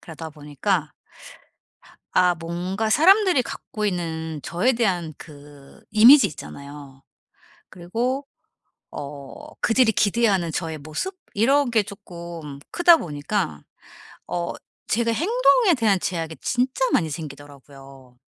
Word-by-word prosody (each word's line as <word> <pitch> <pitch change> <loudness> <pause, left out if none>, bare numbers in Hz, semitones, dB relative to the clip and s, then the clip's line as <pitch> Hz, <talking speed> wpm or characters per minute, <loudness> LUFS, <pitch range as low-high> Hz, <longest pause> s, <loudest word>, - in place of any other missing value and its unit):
그러다 160 -1 -9
보니까 150 +2 -2 1.2
아 180 -1 +4
뭔가 175 +6 -3
사람들이 370 - +5
갖고 215 -2 -6
있는 160 -4 -3
저에 195 +8 +1
대한 180 -9 -1
그 145 -2 -14
이미지 225 +4 +8
있잖아요. 140 -2 -11 0.7
그리고 240 +10 -3 0.6
어 145 - -9
그들이 230 0 +3
기대하는 205 -4 +1
저의 160 -1 -3
모습 155 - -5 0.2
이런 270 +6 +3
게 220 -3 +3
쪼끔 170 -7 -9
크다 350 -1 +6
보니까 150 - -3 0.7
어 170 -1 -3 0.3
제가 230 +1 +1
행동에 450 - +3
대한 210 -5 +2
제약이 165 -3 -4
진짜 255 +1 0
많이 160 -3 +2
생기더라고요. 140 -4 -11
175 Hz, 245 characters per minute, -23 LUFS, 150-235 Hz, 1.2 s, 이미지